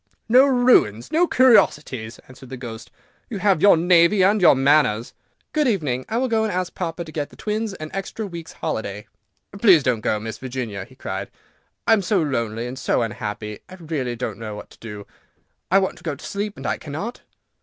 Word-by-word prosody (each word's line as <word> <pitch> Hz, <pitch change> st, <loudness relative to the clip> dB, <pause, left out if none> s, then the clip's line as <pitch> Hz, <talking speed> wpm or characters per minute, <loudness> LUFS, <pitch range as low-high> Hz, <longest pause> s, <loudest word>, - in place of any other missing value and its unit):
"No 255 Hz, +4 st, +6 dB
ruins! 245 Hz, -, +3 dB
no 345 Hz, +3 st, +3 dB
curiosities!" 150 Hz, -, +3 dB
answered 130 Hz, 0 st, -14 dB
the 130 Hz, -, -7 dB
Ghost; 115 Hz, -3 st, -8 dB, 0.4 s
"you 220 Hz, -, -4 dB
have 195 Hz, -4 st, +2 dB
your 200 Hz, -3 st, +7 dB
navy 175 Hz, +3 st, +4 dB
and 205 Hz, +2 st, +3 dB
your 175 Hz, -, +7 dB
manners." 135 Hz, -5 st, +2 dB, 0.4 s
"Good 300 Hz, -2 st, +2 dB
evening; 145 Hz, -, -1 dB
I 225 Hz, -, -1 dB
will 260 Hz, +2 st, +1 dB
go 225 Hz, -2 st, +1 dB
and 220 Hz, -, -1 dB
ask 180 Hz, 0 st, -2 dB
papa 170 Hz, -1 st, -4 dB
to 155 Hz, -, -10 dB
get 150 Hz, -2 st, -3 dB
the -, -, -17 dB
twins 215 Hz, -1 st, -3 dB
an 155 Hz, -2 st, -8 dB
extra 195 Hz, +3 st, -4 dB
week's 170 Hz, -4 st, -8 dB
holiday." 105 Hz, -1 st, -4 dB, 0.5 s
"Please 190 Hz, -9 st, +6 dB
don't 125 Hz, -4 st, 0 dB
go, 110 Hz, -, 0 dB
Miss 110 Hz, 0 st, -6 dB
Virginia," 120 Hz, -7 st, -5 dB
he -, -, -19 dB
cried; -, -, -5 dB, 0.6 s
"I -, -, +5 dB
am 220 Hz, -, +3 dB
so 195 Hz, +1 st, +1 dB
lonely 115 Hz, -7 st, -2 dB
and 125 Hz, +2 st, -6 dB
so 125 Hz, -, +1 dB
unhappy, 105 Hz, -1 st, -5 dB
and 185 Hz, 0 st, -12 dB
I 165 Hz, 0 st, -8 dB
really 125 Hz, -5 st, -1 dB
don't 120 Hz, 0 st, -5 dB
know 110 Hz, -2 st, -6 dB
what 105 Hz, -, -10 dB
to -, -, -18 dB
do. 105 Hz, -3 st, -8 dB, 0.6 s
I 190 Hz, -, +5 dB
want 190 Hz, -1 st, 0 dB
to -, -, -20 dB
go 160 Hz, -5 st, -3 dB
to 140 Hz, -, -12 dB
sleep 205 Hz, +1 st, -4 dB
and -, -, -9 dB
I -, -, -1 dB
cannot." 160 Hz, -, -6 dB
155 Hz, 210 wpm, -22 LUFS, 120-200 Hz, 0.6 s, your